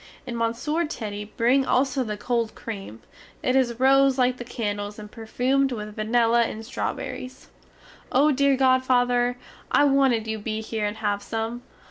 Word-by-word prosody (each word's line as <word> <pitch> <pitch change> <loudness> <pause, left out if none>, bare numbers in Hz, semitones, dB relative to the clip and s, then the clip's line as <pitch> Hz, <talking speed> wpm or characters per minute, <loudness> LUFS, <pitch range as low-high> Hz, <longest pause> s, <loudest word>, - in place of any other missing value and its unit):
And 245 -2 -5
Monsieur 235 +8 -1
Teddy 210 -10 -5
bring 240 +6 +2
also 265 0 +1
the 210 -3 -4
cold 235 0 -1
cream; 195 - -8 0.4
it 255 - +1
is 245 -3 +1
rose 270 0 +4
like 255 -1 +2
the 245 - -6
candles 205 -3 -4
and 210 -1 -10
perfumed 255 +4 0
with 210 -3 -6
vanilla 230 +2 +2
and 225 -1 -3
strawberries. 255 +2 -5 0.6
Oh 290 +4 +4
dear 280 0 +3
godfather, 250 -2 +2 0.3
I - - +4
wanted 270 -5 +3
you 220 0 -3
be 215 +1 -3
here 220 -1 -2
and 205 +1 -5
have 205 -2 -1
some! 225 +3 -4
240 Hz, 155 wpm, -25 LUFS, 220-260 Hz, 0.6 s, rose